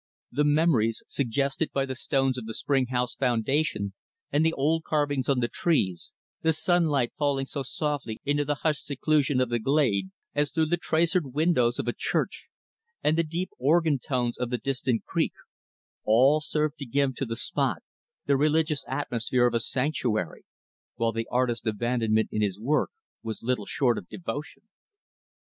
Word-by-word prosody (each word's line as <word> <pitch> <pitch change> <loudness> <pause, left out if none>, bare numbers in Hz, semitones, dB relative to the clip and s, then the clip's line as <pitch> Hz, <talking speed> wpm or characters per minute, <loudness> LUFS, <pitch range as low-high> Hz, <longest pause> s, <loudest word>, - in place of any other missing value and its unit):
The 145 +4 +1
memories 145 -7 +2
suggested 140 +4 0
by 135 -1 0
the 130 - -4
stones 135 0 0
of 125 -3 -6
the 110 - -5
spring 135 -3 +1
house 125 -1 -1
foundation 125 -3 0 0.4
and 145 +2 +3
the 160 - +3
old 160 +3 +1
carvings 145 -4 0
on 135 -3 +3
the 120 - +2
trees; 100 - 0 0.3
the 160 0 +3
sunlight, 160 -6 +2
falling 140 -2 +1
so 140 +1 -4
softly 135 -4 -3
into 145 +1 +2
the 145 +1 -1
hushed 155 -2 +1
seclusion 145 -1 +1
of 130 -1 +1
the 120 0 0
glade, 110 -7 +1 0.2
as 145 -1 +1
through 160 -1 +2
the 175 +3 +1
traceried 165 -3 +1
windows 145 -7 +3
of - - -3
a - - +1
church; - - -2 0.6
and 155 - +3
the 165 - +3
deep 170 +4 -3
organ 155 +1 +3
tones 125 -3 -1
of 125 -1 -1
the 125 - 0
distant 125 -1 -1
creek; - - 0 0.7
all 130 +8 +5
served 150 0 -1
to 140 - -5
give 140 +2 +1
to 135 - -1
the 115 - -3
spot 115 - -1 0.4
the 140 - +3
religious 150 +1 +2
atmosphere 125 -2 0
of 120 - +2
a 115 - +2
sanctuary; 120 - -1 0.5
while 115 0 +1
the 115 0 -3
artist's 120 -2 0
abandonment 110 0 +1
in 105 - -1
his 100 -2 0
work 145 +7 +1 0.3
was 110 -1 -6
little 120 -4 -1
short 125 -5 +1
of 90 - -15
devotion. 160 -2 -6
135 Hz, 170 wpm, -27 LUFS, 120-150 Hz, 0.7 s, all